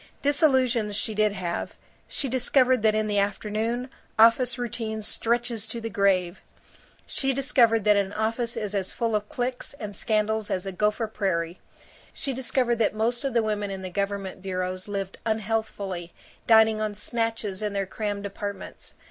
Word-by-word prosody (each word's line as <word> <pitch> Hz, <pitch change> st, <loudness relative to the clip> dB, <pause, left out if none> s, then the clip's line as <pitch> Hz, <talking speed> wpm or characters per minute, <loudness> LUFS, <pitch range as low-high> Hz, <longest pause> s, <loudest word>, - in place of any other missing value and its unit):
Disillusions 260 Hz, -7 st, +3 dB
she 220 Hz, -, -1 dB
did 215 Hz, -1 st, +2 dB
have. 180 Hz, -3 st, -3 dB, 0.3 s
She 280 Hz, -, -2 dB
discovered 255 Hz, 0 st, +3 dB
that 215 Hz, 0 st, +3 dB
in 215 Hz, 0 st, +1 dB
the 205 Hz, -1 st, +1 dB
afternoon, 215 Hz, +5 st, -1 dB, 0.3 s
office 235 Hz, +2 st, +5 dB
routine 225 Hz, -2 st, -3 dB
stretches 235 Hz, 0 st, 0 dB
to 230 Hz, +1 st, -4 dB
the 225 Hz, 0 st, -5 dB
grave. 190 Hz, -2 st, +2 dB, 0.6 s
She 270 Hz, -1 st, -1 dB
discovered 250 Hz, -5 st, +3 dB
that 210 Hz, 0 st, +5 dB
an 200 Hz, -1 st, +1 dB
office 230 Hz, +2 st, -1 dB
is 210 Hz, -1 st, -2 dB
as 195 Hz, -2 st, -1 dB
full 230 Hz, -2 st, -1 dB
of 210 Hz, 0 st, -2 dB
cliques 250 Hz, +2 st, -3 dB
and 210 Hz, -6 st, -6 dB
scandals 215 Hz, 0 st, 0 dB
as 185 Hz, 0 st, -1 dB
a 195 Hz, -, -3 dB
Gopher 210 Hz, +4 st, +1 dB
Prairie. 185 Hz, -5 st, -2 dB, 0.5 s
She 275 Hz, -, -3 dB
discovered 250 Hz, -1 st, +1 dB
that 220 Hz, -2 st, +1 dB
most 235 Hz, +4 st, 0 dB
of 270 Hz, -3 st, -2 dB
the 230 Hz, -, +4 dB
women 210 Hz, -1 st, -1 dB
in 190 Hz, -1 st, -5 dB
the 185 Hz, -, -5 dB
government 200 Hz, -1 st, -3 dB
bureaus 185 Hz, 0 st, -3 dB
lived 195 Hz, -2 st, -4 dB
unhealthfully, 210 Hz, -5 st, -2 dB, 0.3 s
dining 220 Hz, -1 st, +6 dB
on 215 Hz, -1 st, -2 dB
snatches 225 Hz, -3 st, -2 dB
in 210 Hz, -1 st, -2 dB
their 200 Hz, -1 st, 0 dB
crammed 205 Hz, +1 st, -3 dB
apartments. 200 Hz, 0 st, -6 dB
215 Hz, 165 wpm, -26 LUFS, 200-235 Hz, 0.6 s, dining